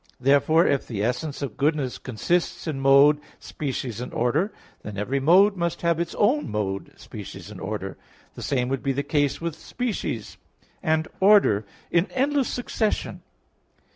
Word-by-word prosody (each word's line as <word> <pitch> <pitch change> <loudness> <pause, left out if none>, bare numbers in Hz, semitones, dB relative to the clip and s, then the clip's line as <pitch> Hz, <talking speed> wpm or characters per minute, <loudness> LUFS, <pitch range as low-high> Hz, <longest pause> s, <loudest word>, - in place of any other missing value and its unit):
Therefore 145 +6 +4
if 140 -1 +1
the 105 -4 -3
essence 125 +5 -2
of 130 -7 -5
goodness 145 -3 0
consists 135 +9 -1
in 155 -5 -3
mode, 140 +2 +6 0.2
species 130 -5 -4
and 125 - -6
order, 150 - +1 0.3
then 105 -1 -7
every 125 +7 -1
mode 190 +8 +5
must 170 -1 -2
have 170 -1 +2
its 170 0 -3
own 255 +9 +2
mode, 100 -2 -3
species - - -9
and - - -10
order. - - -4 0.4
The - - -10
same 125 -3 0
would 135 -1 -1
be 135 - 0
the 140 +2 -1
case 145 -2 0
with 165 -2 -3
species 210 - -4 0.4
and 160 0 +1
order 190 - +5 0.2
in 170 +3 +2
endless 275 0 +1
succession. 225 -3 -2
145 Hz, 155 wpm, -25 LUFS, 125-170 Hz, 0.4 s, mode